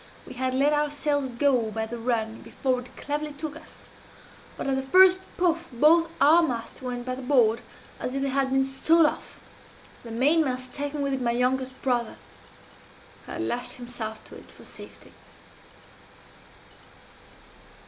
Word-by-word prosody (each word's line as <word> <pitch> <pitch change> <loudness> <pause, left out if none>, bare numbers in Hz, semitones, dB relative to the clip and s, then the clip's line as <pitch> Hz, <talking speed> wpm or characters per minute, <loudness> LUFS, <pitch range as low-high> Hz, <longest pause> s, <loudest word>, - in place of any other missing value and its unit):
We - - -10
had 255 0 -2
let 285 +3 +3
our 295 0 +1
sails 285 -2 -1
go 245 -2 +1
by 220 +1 -3
the 235 +1 -7
run 225 -2 -2
before 260 -2 -1
it 250 +1 -12
cleverly 295 +1 -3
took 300 +1 -6
us; - - -13 0.7
but, - - -4
at 270 -1 +1
the 265 - 0
first 370 +7 +6 0.2
puff, 340 -2 +1
both 320 +7 +4
our 310 +5 +6
masts 245 -8 -3
went 245 -1 -5
by 255 - -2
the 255 - -6
board 245 -4 +3 0.4
as 250 - -4
if 275 - -1
they 275 - 0
had 270 0 +1
been 270 0 +2
sawed 315 +5 +3
off 300 - -3 0.6
the 235 - -11
mainmast 255 0 +1
taking 285 0 -3
with 275 -1 -1
it 265 - -2
my 240 - 0
youngest 255 +2 0
brother, 240 -3 0 1.1
who - - -6
had - - -3
lashed 245 +1 -3
himself 240 -3 -6
to - - -12
it - - -14
for - - -16
safety. - - -12
265 Hz, 165 wpm, -26 LUFS, 245-295 Hz, 1.1 s, first